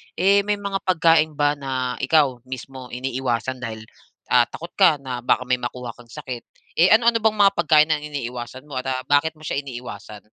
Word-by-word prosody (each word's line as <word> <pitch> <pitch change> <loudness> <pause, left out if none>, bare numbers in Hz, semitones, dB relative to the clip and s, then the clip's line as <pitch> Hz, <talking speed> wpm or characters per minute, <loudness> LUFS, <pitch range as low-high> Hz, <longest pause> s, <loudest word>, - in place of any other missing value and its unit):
Eh, 195 +3 +4
may 210 - +2
mga 200 -1 -3
pagkain 160 -3 +3
ba 145 0 +1
na 130 -2 -3
ikaw 140 -6 +2
mismo 130 0 -8
iniiwasan 125 -1 -3
dahil, 110 -2 -6 0.5
ah, 125 -1 +5
takot 170 +1 -9
ka 175 -5 +6
na 130 -3 -6
baka 125 +1 +1
may 125 0 0
makuha 120 0 -5
kang 120 0 -17
sakit? 125 -1 -8 0.3
Eh, 175 - +7
ano-ano 230 +2 +4
bang 220 -1 +1
mga 195 - +6
pagkain 155 -1 +4
ang 155 - +2
iniiwasan 125 -2 -6
mo 140 -3 -5
at, 130 - -6
ah, 130 -1 -2
bakit 145 +3 +2
mo 155 - -17
siya 140 - -2
iniiwasan? 125 -5 -9
135 Hz, 190 wpm, -22 LUFS, 125-160 Hz, 0.5 s, Eh